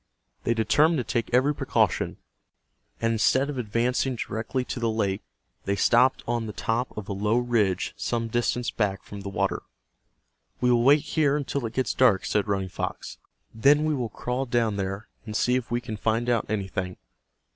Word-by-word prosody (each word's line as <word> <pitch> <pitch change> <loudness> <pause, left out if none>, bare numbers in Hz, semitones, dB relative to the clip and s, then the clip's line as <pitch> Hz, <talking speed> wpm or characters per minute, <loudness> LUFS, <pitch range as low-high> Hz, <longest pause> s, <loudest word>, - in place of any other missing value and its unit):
They 115 - +2
determined 145 +9 +3
to 125 - 0
take 115 -1 -2
every 130 +4 +3
precaution, - - 0 0.8
and 115 0 +1
instead 130 +5 +2
of 135 - -5
advancing 125 +3 0
directly 115 +3 -3
to 125 - -4
the 115 -1 +1
lake 105 -3 -1 0.4
they 100 - +1
stopped 120 +6 +3
on 120 -1 -1
the 105 - -6
top 115 +5 -1
of 105 - -5
a - - -3
low 105 +4 +1
ridge 115 -7 +1
some 115 -1 -2
distance 120 +1 0
back 100 -3 -1
from 100 -1 -9
the 100 - -5
water. 95 - -1 1.0
"We 125 0 +3
will 120 -1 +4
wait 140 +4 +6
here 150 -2 +1
until 140 -3 -2
it 110 - -9
gets 130 -4 0
dark," 120 -7 +4
said 105 0 0
Running 95 -2 -1
Fox. - - -5 0.3
"Then 145 +7 +4
we 155 - +1
will 125 -5 -2
crawl 125 +5 -3
down 120 -3 +1
there, 100 +2 -3 0.2
and 105 - -5
see 125 - +2
if 125 -2 -2
we 120 +1 0
can 115 -3 -6
find 115 +3 0
out 115 -3 +1
anything." 95 -3 -3
115 Hz, 185 wpm, -26 LUFS, 105-125 Hz, 1.0 s, wait